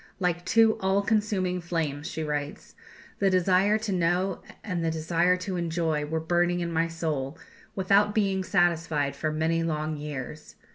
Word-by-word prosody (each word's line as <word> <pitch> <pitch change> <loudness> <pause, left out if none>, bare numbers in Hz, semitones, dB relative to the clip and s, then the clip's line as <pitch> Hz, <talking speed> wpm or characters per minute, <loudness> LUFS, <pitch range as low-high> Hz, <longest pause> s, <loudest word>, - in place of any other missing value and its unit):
"Like 175 -2 0
two 225 +3 +4
all 195 0 +1
consuming 200 -4 0
flames," 160 -4 -2
she 160 - -4
writes, 150 -1 -4 0.5
"the 195 - +3
desire 185 +3 +3
to 220 -1 -4
know 180 +1 0 0.2
and 180 -5 -2
the 165 - +1
desire 170 +3 +1
to 185 0 -4
enjoy 165 -3 -1
were 160 +2 -2
burning 175 +2 +1
in 170 -1 -2
my 165 +1 +2
soul, 155 -4 -3 0.4
without 200 +2 +3
being 195 -3 +1
satisfied 165 -7 +1
for 155 +2 -2
many 160 +2 0
long 155 -1 -2
years. 150 0 -7
170 Hz, 155 wpm, -27 LUFS, 155-190 Hz, 0.5 s, two